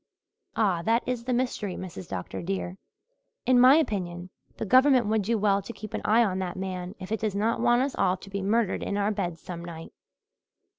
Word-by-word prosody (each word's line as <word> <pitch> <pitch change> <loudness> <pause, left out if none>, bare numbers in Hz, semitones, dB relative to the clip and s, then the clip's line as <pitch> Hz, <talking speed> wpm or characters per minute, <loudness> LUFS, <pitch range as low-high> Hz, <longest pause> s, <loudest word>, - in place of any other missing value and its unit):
"Ah, 195 -6 +2
that 230 +6 +2
is 245 -2 -2
the 255 - -1
mystery, 240 -6 -1
Mrs. 180 -1 -8
Dr. - - -5
dear. 190 0 -4 0.7
In 250 0 +5
my 255 +3 +8
opinion 185 - -1 0.3
the - - -3
Government 255 +2 +5
would 215 +1 +1
do 225 +4 0
well 200 -1 +2
to 200 - -8
keep 215 -2 -9
an - - -2
eye 225 +3 +4
on 190 -4 -1
that 185 -1 -4
man 185 0 -5
if 185 +1 -8
it 220 - 0
does 215 -3 -2
not 225 +3 0
want 240 +1 +4
us 190 -9 0
to 195 - -11
be 200 - -2
all 190 - -4
murdered 215 -1 +1
in 200 - -2
our 205 +1 +1
beds 175 -5 -3
some 170 0 -7
night. 165 -1 -9
205 Hz, 210 wpm, -27 LUFS, 185-235 Hz, 0.7 s, my